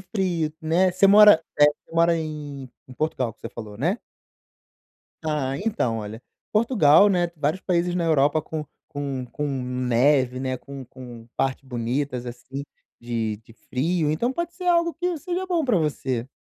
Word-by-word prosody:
frio, 180 Hz, -6 st, -1 dB
né, 170 Hz, +4 st, +2 dB
você 185 Hz, +2 st, +4 dB
mora 205 Hz, -3 st, +8 dB, 0.2 s
eh, 145 Hz, -, +8 dB
você 150 Hz, +2 st, 0 dB
mora 170 Hz, 0 st, +4 dB
em 145 Hz, -4 st, -6 dB, 0.2 s
em -, -, -10 dB
Portugal 130 Hz, -5 st, -2 dB
que -, -, -35 dB
você -, -, -6 dB
falou, 105 Hz, -3 st, -9 dB
né? 170 Hz, -, +1 dB, 1.3 s
Ah, 150 Hz, -4 st, -1 dB
então, 195 Hz, -, -1 dB
olha: 110 Hz, +2 st, -7 dB, 0.3 s
Portugal, 210 Hz, -, +5 dB
né, 175 Hz, -3 st, +1 dB
vários 150 Hz, +5 st, -1 dB
países 175 Hz, -1 st, 0 dB
na 175 Hz, -1 st, 0 dB
Europa 155 Hz, -1 st, +3 dB
com 155 Hz, 0 st, -5 dB, 0.2 s
com 140 Hz, -4 st, -4 dB
com 150 Hz, -, -3 dB
neve, 125 Hz, 0 st, +1 dB
né, 130 Hz, -1 st, -2 dB
com 135 Hz, 0 st, -9 dB
com 120 Hz, -2 st, -11 dB
partes 135 Hz, 0 st, -1 dB
bonitas 125 Hz, +1 st, -2 dB
assim 125 Hz, +3 st, -7 dB, 0.4 s
de 115 Hz, -3 st, -2 dB
de 115 Hz, +1 st, -19 dB
frio, 155 Hz, +7 st, -1 dB
então 235 Hz, +12 st, 0 dB
pode 340 Hz, +3 st, -4 dB
ser 360 Hz, +1 st, -8 dB
algo 340 Hz, -2 st, +3 dB
que 355 Hz, +2 st, -2 dB
seja 360 Hz, +3 st, -3 dB
bom 345 Hz, -4 st, 0 dB
pra 245 Hz, -6 st, +2 dB
você. 135 Hz, -6 st, -2 dB
150 Hz, 165 wpm, -24 LUFS, 130-180 Hz, 1.3 s, mora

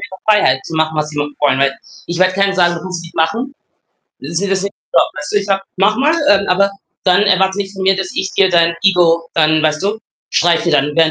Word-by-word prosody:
ist -, -, -6 dB
klar 190 Hz, -, -12 dB
Freiheit 205 Hz, -12 st, +3 dB
zu 165 Hz, -, -7 dB
machen, 160 Hz, 0 st, 0 dB
was 150 Hz, 0 st, -1 dB
sie 150 Hz, -, -10 dB
wollen. 145 Hz, -2 st, -1 dB
Weil 140 Hz, 0 st, 0 dB, 0.3 s
ich 170 Hz, 0 st, -4 dB
werde 185 Hz, 0 st, +3 dB
keinem 195 Hz, 0 st, +1 dB
sagen, 175 Hz, -2 st, +2 dB
das 170 Hz, +1 st, -8 dB
muss 180 Hz, -2 st, -5 dB
ich 165 Hz, -, -12 dB
machen. 230 Hz, -, -1 dB, 0.7 s
Sie 150 Hz, +5 st, -8 dB
sieht 195 Hz, +3 st, -1 dB
das 195 Hz, 0 st, 0 dB
nicht 200 Hz, -, -5 dB, 0.2 s
so. -, -, +4 dB
Weißt 150 Hz, 0 st, -2 dB
du? -, -, 0 dB
Ich 200 Hz, -, -5 dB
sage, 195 Hz, -1 st, 0 dB
mach 205 Hz, +3 st, +2 dB
mal, 295 Hz, +5 st, +2 dB, 0.2 s
ähm, 200 Hz, -1 st, +3 dB
aber 200 Hz, +2 st, +2 dB, 0.3 s
dann 185 Hz, +1 st, +4 dB
erwarte 190 Hz, -1 st, +2 dB
nicht 195 Hz, -1 st, -4 dB
von 195 Hz, -1 st, -7 dB
mir, 190 Hz, 0 st, +3 dB
dass 190 Hz, -1 st, -3 dB
ich 190 Hz, -, -2 dB
dir 190 Hz, -1 st, +3 dB
dein 170 Hz, -1 st, +3 dB
Ego 170 Hz, -3 st, +3 dB
dann, 155 Hz, -1 st, +2 dB
weißt 155 Hz, 0 st, 0 dB
du, 210 Hz, +3 st, -2 dB, 0.3 s
streichle 170 Hz, 0 st, +1 dB
dann, 150 Hz, 0 st, +1 dB
wenn 165 Hz, -1 st, +4 dB
180 Hz, 250 wpm, -15 LUFS, 160-195 Hz, 0.7 s, so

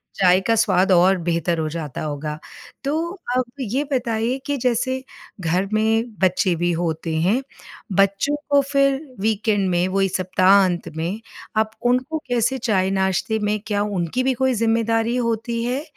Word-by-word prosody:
चाय 185 Hz, -1 st, +4 dB
का 230 Hz, -, +4 dB
स्वाद 195 Hz, -3 st, +3 dB
और 185 Hz, +1 st, +5 dB
बेहतर 170 Hz, 0 st, -1 dB
हो 155 Hz, -1 st, -1 dB
जाता 155 Hz, -4 st, -5 dB
होगा। 150 Hz, 0 st, -4 dB, 0.5 s
तो 285 Hz, +3 st, 0 dB, 0.4 s
अब 255 Hz, -, +3 dB, 0.2 s
ये 260 Hz, +3 st, -1 dB
बताइए 235 Hz, -1 st, 0 dB
कि 285 Hz, -1 st, -1 dB
जैसे 255 Hz, +1 st, 0 dB, 0.4 s
घर 180 Hz, +3 st, 0 dB
में 225 Hz, +2 st, +1 dB
बच्चे 185 Hz, -1 st, +2 dB
भी 175 Hz, +1 st, 0 dB
होते 160 Hz, -1 st, -2 dB
हैं, 205 Hz, +10 st, +2 dB, 0.5 s
बच्चों 195 Hz, +9 st, +2 dB
को 285 Hz, -1 st, +5 dB
फिर 275 Hz, -1 st, +3 dB, 0.2 s
वीकेंड 210 Hz, -1 st, +1 dB
में 175 Hz, +1 st, +1 dB
वही 195 Hz, 0 st, +1 dB
सप्ताहांत 185 Hz, -1 st, +3 dB
में, 170 Hz, +6 st, -2 dB, 0.4 s
अब 220 Hz, 0 st, +1 dB
उनको 255 Hz, +6 st, +1 dB
कैसे 245 Hz, +1 st, +1 dB
चाय-नाश्ते 190 Hz, -2 st, 0 dB
में 210 Hz, 0 st, 0 dB
क्या 205 Hz, -1 st, 0 dB
उनकी 205 Hz, +3 st, -1 dB
भी 265 Hz, -, +2 dB
कोई 260 Hz, -, +3 dB
ज़िम्मेदारी 230 Hz, 0 st, +1 dB
होती 230 Hz, -1 st, -1 dB
है 250 Hz, +4 st, -2 dB
210 Hz, 150 wpm, -21 LUFS, 185-240 Hz, 0.5 s, और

